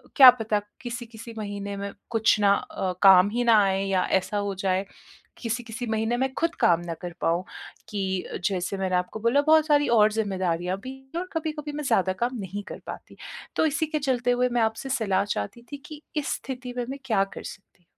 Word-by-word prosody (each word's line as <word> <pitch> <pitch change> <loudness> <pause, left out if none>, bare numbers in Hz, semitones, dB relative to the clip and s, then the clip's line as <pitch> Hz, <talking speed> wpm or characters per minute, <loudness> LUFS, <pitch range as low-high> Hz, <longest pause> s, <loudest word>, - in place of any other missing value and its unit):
क्या 260 -2 +11
पता? 225 -3 -1 0.2
किसी-किसी 235 -2 -7
महीने 200 -1 -5
में 200 0 -4 0.2
कुछ 220 -1 +3
ना 200 -1 +5
अ, 185 -2 -3
काम 190 0 +8
ही 240 +3 -1
ना 230 -2 +6
आएँ 195 0 0
या 185 -1 +2 0.2
ऐसा 205 +3 -4
हो 200 -1 -2
जाएँ, 190 +1 +1 0.5
किसी-किसी 235 +1 -4
महीने 220 +2 0
में 265 +1 0
ख़ुद 335 0 0
काम 170 -1 +5
ना 170 - -3
कर 175 - -5
पाऊँ 170 +2 +1 0.5
कि 190 -3 -2 0.2
जैसे 190 0 -1
मैंने 190 -1 0
आपको 180 +4 -2
बोला 235 +6 +3
बहुत 315 0 +6
सारी 290 -1 +4
और 215 0 +6
ज़िम्मेदारियाँ 185 -4 -1
भी 260 - -6 0.2
हैं - - 0
और 370 - -6
कभी-कभी 305 -2 -3
मैं 300 - -3
ज़्यादा 195 -7 +2
काम 245 0 -1
नहीं 200 +1 -5
कर - - -9
पाती। - - -9 0.4
तो - - +4
इसी 310 +2 0
के 305 0 -2
चलते 250 -3 +1
हुए 250 +1 +2
मैं 240 -1 +1
आपसे 225 +4 -1
सलाह 210 -7 +1
चाहती 205 - -4
थी 285 - -5
कि 305 -1 -10 0.2
इस 295 - 0
स्थिति 250 -2 -7
में 245 - -1
मैं 275 +1 -5
क्या 210 -5 +2
कर 195 - -8
सकती 190 -2 -11
हूँ? - - -40
220 Hz, 205 wpm, -26 LUFS, 195-250 Hz, 0.5 s, क्या